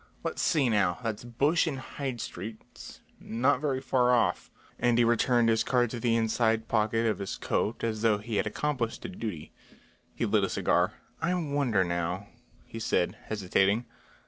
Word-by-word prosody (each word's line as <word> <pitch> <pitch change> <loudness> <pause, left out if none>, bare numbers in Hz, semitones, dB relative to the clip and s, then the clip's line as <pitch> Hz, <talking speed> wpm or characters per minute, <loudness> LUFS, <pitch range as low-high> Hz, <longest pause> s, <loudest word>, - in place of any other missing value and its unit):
Let's - - -2
see 150 -6 +2
now! 100 -6 +2
That's 110 -1 -3
Bush 140 +9 +1
and 145 -4 -2
Hyde 130 -1 -5
streets, 110 +3 -8 0.2
not 130 +4 +1
very 140 -4 0
far 130 -2 +2
off," 115 - +1 0.3
and 120 -1 +3
he 120 - +5
returned 120 0 +3
his 110 -1 +3
card 120 -3 +1
to 120 - -4
the 115 0 +2
inside 115 0 +1
pocket 115 +1 +1
of 110 -2 0
his 100 - -4
coat 110 - -1
as 110 -2 -1
though 110 -2 +3
he 105 +1 -4
had - - +1
accomplished 125 0 -2
a - - -4
duty. 105 - -6 0.6
He - - -1
lit - - +2
a - - +1
cigar. - - +1 0.3
"I 180 +2 +1
wonder 140 - +1
now," 85 +3 -2 0.4
he 115 - -8
said, 90 -5 0
hesitating. 100 +2 +1
115 Hz, 170 wpm, -29 LUFS, 105-125 Hz, 0.6 s, he